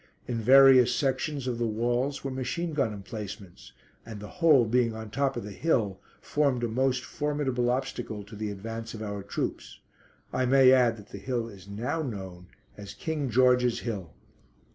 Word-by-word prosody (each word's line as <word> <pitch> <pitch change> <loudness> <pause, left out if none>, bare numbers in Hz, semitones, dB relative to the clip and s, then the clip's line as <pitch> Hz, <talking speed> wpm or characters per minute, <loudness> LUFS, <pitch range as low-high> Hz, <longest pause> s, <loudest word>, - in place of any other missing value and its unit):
In 115 -2 -2
various 130 0 +7
sections 135 0 -1
of 120 -2 -2
the 120 - +1
walls 120 +5 -1
were 135 - -3
machine 130 +6 -3
gun 140 -7 +1
emplacements, 100 -2 -8 0.3
and 110 -2 -9
the 105 - -8
whole 150 -7 +6
being 115 0 +1
on 110 - -6
the 110 - -11
top 135 +1 0
of 120 - -4
the 105 - -7
hill, 105 - 0 0.2
formed 140 -5 0
a - - +1
most 125 +2 0
formidable 145 -5 -1
obstacle 120 -4 -3
to 105 +2 -12
the 105 0 -3
advance 115 +3 -6
of 110 - -6
our 100 -1 -4
troops. 100 - -5 0.5
I 130 - +1
may 130 0 +6
add 125 -3 +4
that 105 - -14
the 100 - -8
hill 120 +1 -2
is 100 -4 -13
now 115 +10 -3
known 95 - -6 0.3
as 100 -1 -9
"King 155 -6 -3
George's 125 0 +3
Hill." 95 -9 -5
120 Hz, 180 wpm, -28 LUFS, 105-130 Hz, 0.5 s, various